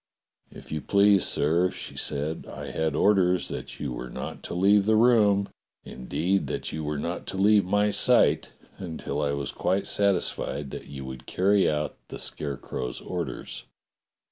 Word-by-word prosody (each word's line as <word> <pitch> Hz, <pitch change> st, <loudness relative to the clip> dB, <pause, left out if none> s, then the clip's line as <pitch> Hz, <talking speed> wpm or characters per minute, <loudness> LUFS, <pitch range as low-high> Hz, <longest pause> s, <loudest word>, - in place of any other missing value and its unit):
*'If -, -, -13 dB
you 75 Hz, -1 st, -2 dB
please, 100 Hz, +3 st, +4 dB
sir," 85 Hz, +5 st, +2 dB
she -, -, -8 dB
said, 75 Hz, +2 st, -2 dB
"I 70 Hz, 0 st, -7 dB
had 80 Hz, +1 st, -1 dB
orders 90 Hz, -1 st, +3 dB
that -, -, -7 dB
you 70 Hz, -4 st, -3 dB
were 60 Hz, +1 st, -6 dB
not 65 Hz, +2 st, -6 dB
to -, -, -5 dB
leave 100 Hz, +2 st, +4 dB
the 110 Hz, -, +4 dB
room, 105 Hz, -4 st, +4 dB, 0.4 s
indeed 85 Hz, +9 st, -1 dB
that -, -, -3 dB
you 80 Hz, 0 st, -4 dB
were 75 Hz, 0 st, -2 dB
not 85 Hz, +4 st, -4 dB
to 95 Hz, -, -4 dB
leave 105 Hz, 0 st, +5 dB
my 105 Hz, +2 st, +2 dB
sight, 100 Hz, -, +3 dB, 0.3 s
until 80 Hz, -5 st, -4 dB
I 70 Hz, -1 st, 0 dB
was 70 Hz, 0 st, -3 dB
quite 95 Hz, +2 st, 0 dB
satisfied 95 Hz, -8 st, 0 dB
that -, -, -7 dB
you 70 Hz, -2 st, -8 dB
would 65 Hz, -1 st, -9 dB
carry 100 Hz, +2 st, +3 dB
out 75 Hz, 0 st, -2 dB
the -, -, -7 dB
Scarecrow's 70 Hz, -3 st, -5 dB
orders." 85 Hz, -8 st, -5 dB
90 Hz, 165 wpm, -26 LUFS, 70-100 Hz, 0.4 s, leave